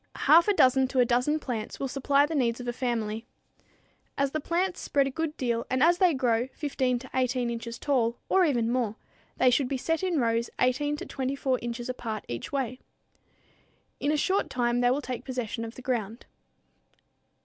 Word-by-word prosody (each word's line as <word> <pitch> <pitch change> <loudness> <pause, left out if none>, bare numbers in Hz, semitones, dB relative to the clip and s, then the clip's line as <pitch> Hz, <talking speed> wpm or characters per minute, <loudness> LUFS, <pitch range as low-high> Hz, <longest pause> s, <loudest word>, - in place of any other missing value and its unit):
Half 335 +4 +5
a 415 - +4
dozen 260 -2 +4
to 260 0 -1
a 250 - +6
dozen 250 +6 +2
plants 240 -7 -5
will 275 - -1
supply 275 +2 +2
the 310 - -5
needs 240 -5 +1
of 245 - -7
a 240 - -1
family. 230 -3 -2 0.9
As 275 -1 +1
the 310 - -1
plants 350 +4 -1
spread 280 -1 +1
a 270 - -2
good 320 +2 -3
deal 235 -2 -1
and 260 +2 +2
as 345 +2 +4
they 360 -5 +4
grow 245 -2 +1
15 260 -4 -1
to 255 +2 -10
18 250 -2 0
inches 235 0 -5
tall, 240 -5 0
or 380 - +4
even 240 -8 +1
more, 240 -4 0 0.4
they 255 - +4
should 260 +1 +2
be 270 - -2
set 325 +5 -1
in 360 -5 0
rows 230 -1 +1
18 290 +4 +1
to - - -6
24 265 -1 -1
inches 240 0 -4
apart 225 -4 -4
each 120 -1 -5
way. 260 -2 -2 1.2
In 290 - +1
a 305 - +1
short 380 +6 +1
time 245 -1 0
they 245 - +4
will 270 +4 +1
take 250 -1 -5
possession 245 -3 -4
of 230 0 -7
the 255 - -11
ground. 230 -3 -3
255 Hz, 195 wpm, -28 LUFS, 240-285 Hz, 1.2 s, a